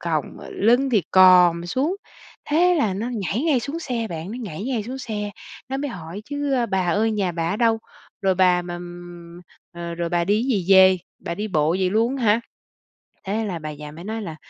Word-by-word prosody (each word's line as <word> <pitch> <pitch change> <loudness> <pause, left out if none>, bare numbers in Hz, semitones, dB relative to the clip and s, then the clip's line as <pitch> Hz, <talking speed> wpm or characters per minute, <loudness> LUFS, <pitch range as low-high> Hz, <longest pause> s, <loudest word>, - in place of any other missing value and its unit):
khòng - - -1
mà - - -11
lưng 245 +5 +2
thì 215 -6 +3
còm 180 -2 +6
xuống. 280 - -1 0.5
Thế 355 +4 +4
là 220 - +1
nó 220 +5 -3
nhảy 210 +4 -2
ngay 295 -7 +2
xuống 280 +8 -4
xe 245 -8 -3
bạn, 165 +3 -5
nó 245 - -6
nhảy 190 0 -6
ngay 245 -4 -1
xuống 250 +5 -6
xe, 210 -4 -4 0.4
nó 265 - -2
mới 285 +1 -3
hỏi 180 -1 -8
chứ 285 -1 -2 0.2
"Bà 190 -1 +1
ơi 215 +5 +2
nhà 195 -4 -1
bà 165 0 -2
ở 200 - -1
đâu? 225 -1 +2 0.4
Rồi 190 -1 +3
bà 180 -1 +3
mà, 175 0 -6
ừm 175 0 -10 0.3
ờ, 170 -1 -6
rồi 170 0 -2
bà 170 0 +1
đi 210 +4 +2
gì 230 -8 0
về? 190 -1 +7 0.2
Bà 170 - -5
đi 210 +4 -4
bộ 155 -4 +1
vậy 185 +1 +1
luôn 230 +6 +1
hả?" 225 -3 +3 0.9
Thế 215 +3 -1
là 180 -5 -4
bà 155 -1 -6
già 150 0 -9
mới 165 +3 -10
nói 220 +3 -4
là 165 -6 -6
195 Hz, 215 wpm, -23 LUFS, 175-235 Hz, 0.9 s, về